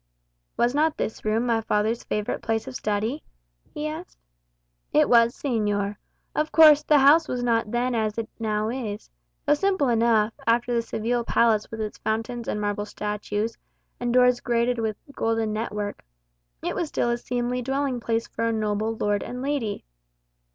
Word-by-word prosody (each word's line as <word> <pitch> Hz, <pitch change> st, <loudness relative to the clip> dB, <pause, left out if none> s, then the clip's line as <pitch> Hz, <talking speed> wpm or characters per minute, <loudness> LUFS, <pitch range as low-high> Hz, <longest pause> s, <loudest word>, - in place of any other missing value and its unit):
"Was 240 Hz, +1 st, +2 dB
not 305 Hz, +2 st, +2 dB
this 220 Hz, -, -3 dB
room 220 Hz, +3 st, +1 dB
my 230 Hz, -2 st, +1 dB
father's 220 Hz, +2 st, 0 dB
favourite 210 Hz, 0 st, -2 dB
place 225 Hz, +1 st, -1 dB
of 265 Hz, -, -6 dB
study?" 215 Hz, +8 st, -1 dB, 0.5 s
he 300 Hz, +1 st, -4 dB
asked. 315 Hz, +4 st, -7 dB, 0.7 s
"It -, -, +4 dB
was, 235 Hz, 0 st, +5 dB
señor. 205 Hz, -6 st, -1 dB, 0.4 s
Of 305 Hz, 0 st, -1 dB
course, 305 Hz, -2 st, +8 dB
the 300 Hz, 0 st, +4 dB
house 295 Hz, +4 st, +6 dB
was 245 Hz, -1 st, -2 dB
not 230 Hz, -3 st, +1 dB
then 245 Hz, +2 st, 0 dB
as 220 Hz, -2 st, -1 dB
it 225 Hz, -1 st, -2 dB
now 215 Hz, -1 st, -1 dB
is. 225 Hz, -, -5 dB, 0.3 s
Though -, -, +4 dB
simple 375 Hz, -3 st, +1 dB
enough, 225 Hz, -2 st, +3 dB
after 240 Hz, +1 st, +2 dB
the 235 Hz, -, +2 dB
Seville 235 Hz, +1 st, -1 dB
palace 225 Hz, -3 st, +2 dB
with 225 Hz, -1 st, -6 dB
its 215 Hz, -1 st, -5 dB
fountains 225 Hz, +2 st, -3 dB
and 210 Hz, -, -2 dB
marble 205 Hz, 0 st, -2 dB
statues, 210 Hz, +1 st, -3 dB, 0.4 s
and 240 Hz, 0 st, -1 dB
doors 250 Hz, 0 st, +4 dB
grated 240 Hz, 0 st, 0 dB
with 220 Hz, -2 st, -2 dB, 0.2 s
golden 225 Hz, -3 st, 0 dB
net 220 Hz, +2 st, -3 dB
work, 205 Hz, -1 st, -4 dB, 0.6 s
it -, -, -1 dB
was 335 Hz, -, -2 dB
still 240 Hz, -4 st, 0 dB
a 240 Hz, -, 0 dB
seemly 245 Hz, +1 st, -2 dB
dwelling 270 Hz, 0 st, -1 dB
place 230 Hz, 0 st, -1 dB
for 230 Hz, -, -3 dB
a 230 Hz, -, +1 dB
noble 215 Hz, 0 st, -1 dB
lord 205 Hz, -1 st, 0 dB
and 250 Hz, +1 st, -6 dB
lady. 275 Hz, -7 st, -2 dB
230 Hz, 170 wpm, -25 LUFS, 215-250 Hz, 0.7 s, course